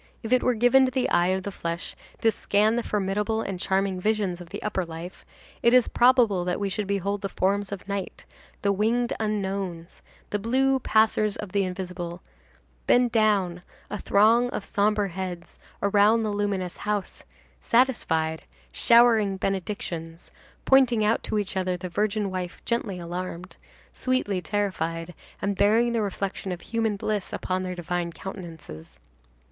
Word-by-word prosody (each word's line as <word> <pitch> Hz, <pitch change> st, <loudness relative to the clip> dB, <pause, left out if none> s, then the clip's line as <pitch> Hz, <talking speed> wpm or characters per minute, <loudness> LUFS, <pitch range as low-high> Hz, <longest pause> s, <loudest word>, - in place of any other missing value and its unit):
If 225 Hz, +2 st, -1 dB
it 255 Hz, -, +4 dB
were 250 Hz, -, +2 dB
given 245 Hz, +4 st, +5 dB
to 255 Hz, -, -1 dB
the 260 Hz, 0 st, 0 dB
eye 175 Hz, -, +3 dB
of 190 Hz, 0 st, 0 dB
the 200 Hz, -, -4 dB
flesh 170 Hz, -2 st, -5 dB, 0.3 s
to 225 Hz, -, +4 dB
scan 210 Hz, +1 st, +2 dB
the 240 Hz, -, +1 dB
formidable 210 Hz, +2 st, -1 dB
and 190 Hz, -2 st, -4 dB
charming 190 Hz, 0 st, 0 dB
visions 205 Hz, -4 st, 0 dB
of 175 Hz, -, -11 dB
the -, -, -7 dB
upper 205 Hz, -3 st, -1 dB
life, 165 Hz, +2 st, -9 dB, 0.4 s
it 235 Hz, +1 st, +5 dB
is 250 Hz, -, +5 dB
probable 240 Hz, -7 st, +4 dB
that 180 Hz, 0 st, -1 dB
we 200 Hz, -1 st, -1 dB
should 200 Hz, +1 st, -3 dB
behold 200 Hz, 0 st, -1 dB
the 195 Hz, -, -3 dB
forms 200 Hz, +2 st, 0 dB
of 200 Hz, -1 st, -7 dB
night, 200 Hz, -1 st, -5 dB, 0.4 s
the 200 Hz, -, +3 dB
winged 230 Hz, +4 st, +1 dB
unknowns, 195 Hz, -5 st, -3 dB, 0.3 s
the 205 Hz, -, 0 dB
blue 265 Hz, +5 st, +2 dB
passers 220 Hz, -3 st, +2 dB
of 205 Hz, -3 st, -7 dB
the 200 Hz, 0 st, +1 dB
invisible, 180 Hz, -2 st, -5 dB, 0.6 s
bend 245 Hz, -1 st, +4 dB
down, 200 Hz, -6 st, +2 dB, 0.3 s
a 210 Hz, -, -3 dB
throng 230 Hz, +4 st, +4 dB
of 210 Hz, -, -5 dB
sombre 205 Hz, 0 st, +1 dB
heads, 180 Hz, -1 st, -6 dB, 0.2 s
around 205 Hz, +3 st, +4 dB
the 215 Hz, -, -1 dB
luminous 200 Hz, -3 st, -2 dB
house, 205 Hz, -2 st, -3 dB, 0.4 s
satisfied, 160 Hz, -11 st, +1 dB, 0.3 s
showering 225 Hz, -, +4 dB
benedictions, 175 Hz, -4 st, -4 dB, 0.3 s
pointing 250 Hz, -5 st, +4 dB
out 220 Hz, +2 st, +2 dB
to -, -, -2 dB
each 200 Hz, -2 st, -2 dB
other 185 Hz, -1 st, 0 dB
the 180 Hz, 0 st, -6 dB
virgin 205 Hz, +2 st, -1 dB
wife 180 Hz, -1 st, -5 dB
gently 230 Hz, -5 st, -1 dB
alarmed, 180 Hz, +1 st, -6 dB, 0.4 s
sweetly 255 Hz, -8 st, -1 dB
terrified, 175 Hz, -4 st, -2 dB, 0.3 s
and 200 Hz, 0 st, 0 dB
bearing 225 Hz, +4 st, +3 dB
the 230 Hz, -, +1 dB
reflection 195 Hz, -1 st, -3 dB
of 175 Hz, -1 st, -5 dB
human 225 Hz, -2 st, -1 dB
bliss 205 Hz, -1 st, -2 dB
upon 185 Hz, 0 st, -2 dB
their 185 Hz, -1 st, -4 dB
divine 175 Hz, 0 st, -3 dB
countenances. 165 Hz, -, -9 dB
200 Hz, 160 wpm, -26 LUFS, 180-220 Hz, 0.6 s, given